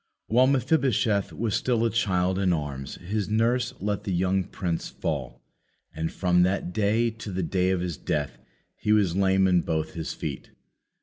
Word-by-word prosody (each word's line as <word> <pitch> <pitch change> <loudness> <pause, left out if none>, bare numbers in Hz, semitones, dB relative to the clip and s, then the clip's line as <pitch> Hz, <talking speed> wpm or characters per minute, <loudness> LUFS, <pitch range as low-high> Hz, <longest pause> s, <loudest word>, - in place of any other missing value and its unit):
While 125 +3 +4
Mephibosheth 130 -6 +2
was 110 -1 -2
still 115 +1 +1
a 115 - +1
child 95 -4 +1
in 95 -2 +2
arms, 70 -4 -4
his 100 +3 -3
nurse 115 +2 +1
let 105 +1 -2
the 100 - -3
young 95 +2 +1
prince 85 -3 -3
fall, - - -4 0.5
and 80 +1 -3
from 90 -1 +2
that 90 -1 0
day 110 +4 +2
to 110 -2 -8
the 95 0 -2
day 90 +2 +1
of 95 -2 +1
his 85 -5 -3
death 70 -5 -2 0.4
he 105 - -1
was 100 -5 +2
lame 95 0 +3
in 90 -2 +4
both 80 -1 -2
his 80 -2 -4
feet. - - -5
95 Hz, 175 wpm, -26 LUFS, 90-110 Hz, 0.5 s, While